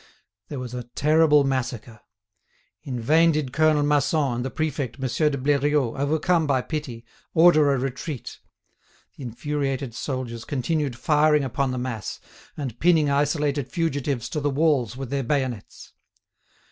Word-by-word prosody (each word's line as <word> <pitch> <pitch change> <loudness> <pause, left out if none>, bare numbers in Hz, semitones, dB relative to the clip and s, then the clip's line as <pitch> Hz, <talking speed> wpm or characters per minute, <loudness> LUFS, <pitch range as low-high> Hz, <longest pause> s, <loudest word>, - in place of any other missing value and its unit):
There 145 - -6
was 125 -1 -6
a 125 -1 -5
terrible 150 0 +4
massacre. 120 -4 -3 0.8
In 125 -3 -5
vain 160 +8 +4
did 145 -4 -2
Colonel 155 -1 +3
Masson 145 -1 +1
and 120 - -2
the 130 - -3
prefect, 145 -5 -3
Monsieur 135 +3 +1
de 140 - -3
Bleriot, 140 -2 +1
overcome 155 +4 +1
by 135 -3 +2
pity, 125 -7 -5 0.3
order 155 -3 +6
a 135 - +1
retreat. 135 +1 -5 0.8
The - - -13
infuriated 135 0 -3
soldiers 120 -3 -4
continued 145 -1 -2
firing 150 +3 +3
upon 135 +1 -1
the 130 - -3
mass, 125 - -4 0.4
and 130 -6 -5
pinning 160 -4 +3
isolated 145 -1 0
fugitives 145 -7 -1
to 150 - -2
the 145 0 0
walls 140 -5 +1
with 135 -2 -6
their 140 -1 0
bayonets. 130 -5 -3
140 Hz, 145 wpm, -24 LUFS, 125-150 Hz, 0.8 s, order